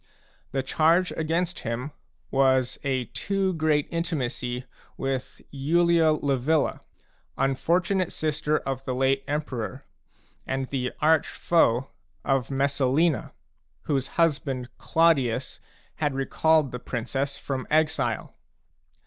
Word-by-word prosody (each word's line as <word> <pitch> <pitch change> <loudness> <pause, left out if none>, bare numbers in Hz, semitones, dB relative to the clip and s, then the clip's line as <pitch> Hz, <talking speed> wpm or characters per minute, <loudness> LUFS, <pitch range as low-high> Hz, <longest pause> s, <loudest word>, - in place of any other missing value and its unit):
The 135 -1 -1
charge 165 +6 +3
against 170 +3 -1
him 120 +6 -4 0.4
was 130 -2 +2
a 130 -3 0
too 195 - -1
great 155 -3 +1
intimacy 130 -7 -2 0.3
with 135 -1 -3
Iulia 160 +2 +3
Livilla, 140 +2 +1 0.6
unfortunate 175 +7 +1
sister 155 0 0
of 135 -1 -4
the 130 - -2
late 135 +1 +2
emperor, 140 -3 -3 0.6
and 135 0 -1
the 125 -2 -2
arch 160 -1 +4
foe 135 -7 +2 0.3
of 135 -4 +1
Messalina, 140 +3 +1 0.5
whose 135 -3 0
husband, 140 -6 +1
Claudius, 135 -7 +2 0.4
had 145 -3 0
recalled 150 +1 +2
the 125 - -5
princess 135 +4 -3
from 135 -2 -4
exile. 150 -7 +1
140 Hz, 105 wpm, -26 LUFS, 130-160 Hz, 0.6 s, arch